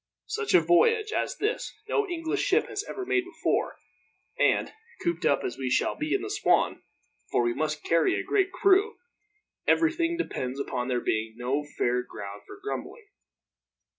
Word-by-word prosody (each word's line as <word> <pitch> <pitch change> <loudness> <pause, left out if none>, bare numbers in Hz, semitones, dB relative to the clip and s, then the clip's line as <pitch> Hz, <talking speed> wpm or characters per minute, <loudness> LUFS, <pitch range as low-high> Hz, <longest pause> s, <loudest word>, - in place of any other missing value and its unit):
Such 440 -3 0
a - - +8
voyage 435 +4 +3
as - - -1
this 435 +4 -2
no 425 -2 +1
English 330 -2 -1
ship - - +3
has 410 - -3
ever 385 - -4
made 370 0 +2
before 365 0 -1 0.6
and, - - +2 0.3
cooped 170 0 0
up 140 - +2
as 120 - -4
we 130 -1 -1
shall - - +2
be 305 +4 -1
in 395 - -1
the 410 - -4
Swan 420 - +2 0.5
for - - +2
we 120 0 +1
must 150 +2 -2
carry 165 -1 +2
a - - -3
great 390 -2 +1
crew 395 +4 +3 0.7
everything 335 +1 +2
depends 130 - -3
upon 125 -3 -2
there 125 -2 0
being 110 0 -1
no 130 +4 -1
fair 125 +1 +2
ground 100 -4 -8
for 400 - -10
grumbling. 415 +1 -6
330 Hz, 165 wpm, -27 LUFS, -, 0.7 s, a